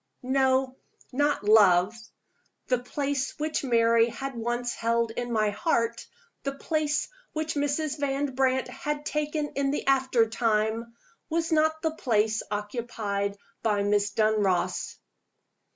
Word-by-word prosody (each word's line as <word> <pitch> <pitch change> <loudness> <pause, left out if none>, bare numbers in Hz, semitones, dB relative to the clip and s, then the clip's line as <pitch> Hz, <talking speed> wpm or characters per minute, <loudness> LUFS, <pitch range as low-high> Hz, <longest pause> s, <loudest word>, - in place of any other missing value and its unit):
No: 260 0 +2 0.3
not 290 -3 +1
love. 205 -2 +5 0.8
The 250 -2 +3
place 275 +2 -2
which 305 0 -2
Mary 230 -2 +4
had 270 +4 -5
once 240 +1 -2
held 230 0 0
in 240 +1 -4
my 215 -2 +2
heart, 235 -2 0 0.3
the 275 - -3
place 305 +1 -1 0.3
which 315 0 -2
Mrs. 290 +1 -1
Van 280 -1 -1
Brandt 260 0 +1
had 295 0 -4
taken 300 0 -1
in 275 0 -1
the 290 - -2
after 260 -4 +3
time, 225 0 0 0.3
was 330 0 -1
not 315 0 +2
the 320 - +1
place 220 -7 +1
occupied 205 -2 -3 0.2
by 210 -3 +1
Miss 205 0 +2
Dunross. 210 -3 0
245 Hz, 125 wpm, -27 LUFS, 220-285 Hz, 0.8 s, love